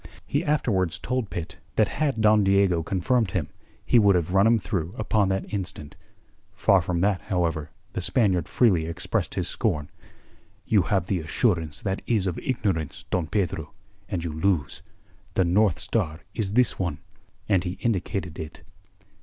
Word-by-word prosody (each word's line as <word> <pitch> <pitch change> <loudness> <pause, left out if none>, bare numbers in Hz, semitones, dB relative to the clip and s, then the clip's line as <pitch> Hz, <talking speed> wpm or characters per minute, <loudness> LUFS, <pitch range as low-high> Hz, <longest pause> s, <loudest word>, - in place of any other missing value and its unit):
He 145 +4 0
afterwards 100 - +1
told 125 -2 -2
Pitt 85 -2 -6 0.2
that 110 - +4
had 140 -5 -1
Don 105 -1 +5
Diego 95 -3 +3
confirmed 100 +6 +1
him, 80 -6 -1 0.4
he 120 - +5
would 100 -3 +5
have 90 0 0
run 100 +2 +5
him 115 0 +5
through 90 -3 -3
upon 105 -2 +1
that 95 0 -1
instant. 90 -7 -4 0.6
Far 95 -2 +4
from 85 0 -1
that, 100 -1 +2
however, 85 -6 -1 0.2
the - - -2
Spaniard 95 - +1
freely 90 -10 +3
expressed 85 - -2
his - - 0
scorn. 75 -1 -1 0.7
"You 105 -3 +4
have 90 +1 0
the 90 0 0
assurance 80 - 0
that 95 -1 -2
is 110 -5 +1
of 90 -3 -2
ignorance, 95 - -2
Don 90 -4 0
Pedro; 100 -2 -2 0.4
and 85 -3 -2
you 85 -2 -3
lose. 80 -3 0 0.5
The 95 - +3
North 95 0 +3
Star 85 -8 -2
is 100 -3 -2
this 125 +2 +3
one." 85 -6 -1 0.5
And 95 -4 +3
he 90 -1 -3
indicated 95 -6 -2
it. 80 -1 -8
95 Hz, 160 wpm, -25 LUFS, 85-105 Hz, 0.7 s, Don